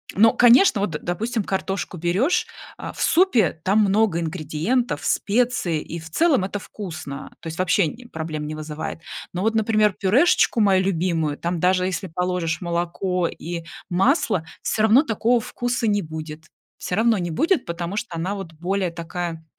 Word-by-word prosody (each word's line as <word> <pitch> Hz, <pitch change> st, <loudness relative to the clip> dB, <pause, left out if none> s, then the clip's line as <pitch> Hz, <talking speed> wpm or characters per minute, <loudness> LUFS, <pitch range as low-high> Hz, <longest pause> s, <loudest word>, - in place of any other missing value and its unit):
Но, 225 Hz, +3 st, +6 dB
конечно, 245 Hz, -, +6 dB
вот, 205 Hz, -, 0 dB
допустим, 220 Hz, +6 st, -2 dB
картошку 190 Hz, -1 st, -3 dB
берёшь, 180 Hz, -, +1 dB, 0.3 s
а, -, -, -6 dB
в -, -, -8 dB
супе, 240 Hz, -, +3 dB
там 200 Hz, +3 st, +3 dB
много 205 Hz, -3 st, +2 dB
ингредиентов, 165 Hz, -, -1 dB
специй, 215 Hz, -7 st, +1 dB
и 170 Hz, -, -7 dB
в 160 Hz, -, -11 dB
целом 280 Hz, -, +3 dB
это 195 Hz, +2 st, -3 dB
вкусно, 165 Hz, -9 st, -7 dB
то -, -, -8 dB
есть 160 Hz, 0 st, -6 dB
вообще 185 Hz, 0 st, +3 dB
н 235 Hz, +8 st, -9 dB
проблем 155 Hz, -2 st, -4 dB
не 155 Hz, -, -5 dB
вызывает. 155 Hz, +1 st, -6 dB, 0.3 s
Но 180 Hz, -, -3 dB
вот, 225 Hz, +1 st, +1 dB
например, 215 Hz, -2 st, +3 dB
пюрешечку 240 Hz, -, +3 dB
мою 190 Hz, -2 st, +4 dB
любимую, 165 Hz, -5 st, 0 dB
там 170 Hz, 0 st, -2 dB
даже 180 Hz, 0 st, +3 dB
если 190 Hz, +1 st, -3 dB
положишь 180 Hz, -1 st, -1 dB
молоко 175 Hz, +1 st, -1 dB
и 170 Hz, 0 st, -6 dB, 0.3 s
масло, 205 Hz, -, +2 dB, 0.2 s
все 215 Hz, -, 0 dB
равно 220 Hz, +6 st, +6 dB
такого 235 Hz, -1 st, +1 dB
вкуса 245 Hz, 0 st, -2 dB
не 205 Hz, -1 st, +2 dB
будет, 155 Hz, -1 st, -8 dB, 0.3 s
все 180 Hz, -, -3 dB
равно 225 Hz, 0 st, +3 dB
не 175 Hz, -2 st, -3 dB
будет, 325 Hz, -, +1 dB
потому 170 Hz, +3 st, -4 dB
что 210 Hz, -5 st, -4 dB
она, 185 Hz, +5 st, -2 dB
вот, 195 Hz, -4 st, -7 dB
более 180 Hz, +3 st, -1 dB
такая, 170 Hz, -1 st, -5 dB
185 Hz, 165 wpm, -23 LUFS, 165-220 Hz, 0.3 s, Но